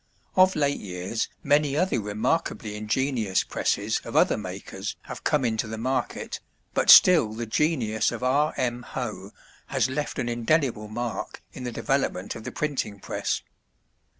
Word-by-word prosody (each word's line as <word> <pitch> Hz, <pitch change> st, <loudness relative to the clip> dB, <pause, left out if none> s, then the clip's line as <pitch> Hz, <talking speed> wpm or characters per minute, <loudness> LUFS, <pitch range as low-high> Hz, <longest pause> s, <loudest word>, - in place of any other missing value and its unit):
Of 185 Hz, 0 st, +5 dB
late 145 Hz, -2 st, +1 dB
years 90 Hz, +3 st, -3 dB
many 145 Hz, 0 st, +3 dB
other 180 Hz, -9 st, +1 dB
remarkably 105 Hz, +1 st, -1 dB
ingenious 110 Hz, -1 st, 0 dB
presses -, -, -1 dB
of -, -, -8 dB
other -, -, +5 dB
makers -, -, -6 dB
have -, -, -8 dB
come 145 Hz, -4 st, +2 dB
into 110 Hz, -1 st, 0 dB
the 110 Hz, +1 st, -5 dB
market, 130 Hz, +4 st, -2 dB, 0.3 s
but -, -, +1 dB
still 155 Hz, -12 st, +8 dB
the 115 Hz, +2 st, -4 dB
genius 110 Hz, -4 st, +1 dB
of -, -, -5 dB
R. 145 Hz, +4 st, +2 dB
M. 120 Hz, -1 st, -1 dB
Hoe 120 Hz, -5 st, -5 dB, 0.4 s
has 130 Hz, -, +1 dB
left 145 Hz, +2 st, -3 dB
an 120 Hz, -, -1 dB
indelible 120 Hz, -1 st, +1 dB
mark 115 Hz, +2 st, -5 dB
in 130 Hz, -, -7 dB
the 120 Hz, -, -3 dB
development 135 Hz, -8 st, -1 dB
of 110 Hz, -, -9 dB
the -, -, -4 dB
printing 135 Hz, -9 st, -2 dB
press. -, -, -2 dB
120 Hz, 150 wpm, -26 LUFS, 110-145 Hz, 0.4 s, still